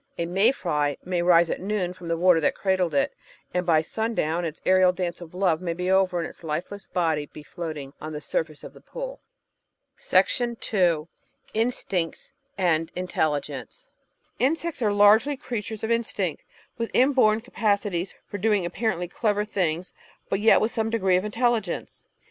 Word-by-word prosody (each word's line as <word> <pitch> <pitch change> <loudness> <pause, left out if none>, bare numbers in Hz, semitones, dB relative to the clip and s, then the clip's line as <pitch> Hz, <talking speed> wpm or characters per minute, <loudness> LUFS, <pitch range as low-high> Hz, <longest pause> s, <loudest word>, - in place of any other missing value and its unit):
A 170 - -1
may 190 +7 +3
fly 150 - -1
may 180 -1 0
rise 170 -1 +5
at - - -2
noon 190 -2 -1
from 180 -2 -11
the 165 0 0
water 180 -1 +5
that 145 - +2
cradled 185 -5 0
it, 140 - +2 0.4
and 180 0 -1
by 160 -2 +4
sun 220 +6 -3
down 165 +1 0
its 160 -1 -5
aerial 185 -1 +5
dance 180 -1 -4
of 175 0 -10
love 180 -3 +1
may 170 -2 -2
be 180 +2 -2
over 190 -2 +3
and 165 - -2
its - - -14
lifeless 175 +6 -4
body 160 -5 0
be 150 - -12
floating 150 -5 -6
on 155 - -5
the 150 - -5
surface 155 0 -3
of - - -9
the - - -16
pool. - - -7 2.3
Instincts 215 -7 -1 0.3
and 165 -4 +1
Intelligence 180 - -3 0.5
Insects 320 +2 0
are 210 -3 +2
largely 215 +8 +5
creatures 220 -5 -5
of 220 - -1
instinct, 210 -7 -1 0.4
with 230 - -1
inborn 250 -5 +4
capaci 210 -4 0
ties 175 +2 -2
for 205 - -6
doing 205 -2 +2
apparently 180 -1 -1
clever 210 +2 0
things, 180 -4 -1 0.4
but 195 - 0
yet 220 +2 +6
with 220 - 0
some 225 -1 -1
degree 195 -5 +2
of 185 - -2
intelligence. 225 -3 -1
185 Hz, 165 wpm, -25 LUFS, 170-215 Hz, 2.3 s, yet